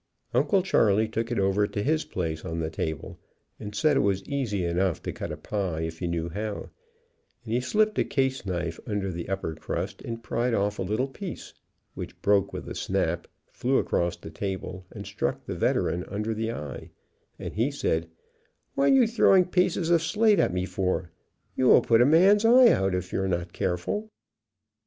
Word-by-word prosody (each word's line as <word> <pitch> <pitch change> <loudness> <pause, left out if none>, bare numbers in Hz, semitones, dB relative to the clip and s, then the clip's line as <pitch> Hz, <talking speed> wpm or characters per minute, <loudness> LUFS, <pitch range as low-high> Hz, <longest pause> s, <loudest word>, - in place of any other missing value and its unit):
Uncle 145 +10 +3
Charley 110 - +3
took 115 +2 -3
it 120 - -1
over 100 +1 +2
to 100 - -3
his 155 +4 +1
place 80 -3 -3
on 80 - -4
the 80 -1 -2
table 80 -1 -4 0.4
and 105 0 -7
said 145 +8 +3
it - - +4
was 100 -1 +1
easy 105 -7 -2
enough 85 0 0
to - - -3
cut - - -5
a - - -5
pie 95 -6 -3
if 80 0 -5
you 90 - -1
knew 85 -1 -2
how, 105 +5 -5 0.7
and 110 - -4
he 120 - +2
slipped 215 +11 +1
a - - +4
caseknife 95 - -2
under 100 -3 -2
the 85 0 -6
upper 95 -4 -2
crust 80 - -4
and 115 0 -6
pried 120 +1 0
off 100 +1 0
a - - -1
little 110 +8 0
piece, 180 +6 -8 0.4
which - - -8
broke 100 -1 +3
with - - -7
a - - -5
snap, - - -1 0.2
flew 130 +2 +1
across 85 0 0
the 80 - -10
table 95 0 -5
and - - -9
struck - - -3
the - - -4
Veteran 90 +1 0
under 105 +3 -2
the 110 +1 -2
eye, 75 - -7 0.5
and - - -6
he 115 +6 +1
said, 80 - -1 0.6
""What 140 - +3
you 265 -3 +6
throwing 200 -5 +4
pieces 180 -1 +1
of 170 -2 +5
slate 210 +5 +3
at - - +3
me 90 +1 -1
for? 95 -3 -2 0.4
You 130 - +2
will - - +7
put 115 0 +4
a 125 - +6
man's 190 +7 +5
eyes 240 +2 +7
out 95 -1 +1
if 90 0 -4
you - - 0
are 95 - 0
not 85 -1 -2
careful." 95 - -2
105 Hz, 195 wpm, -27 LUFS, 90-140 Hz, 0.7 s, will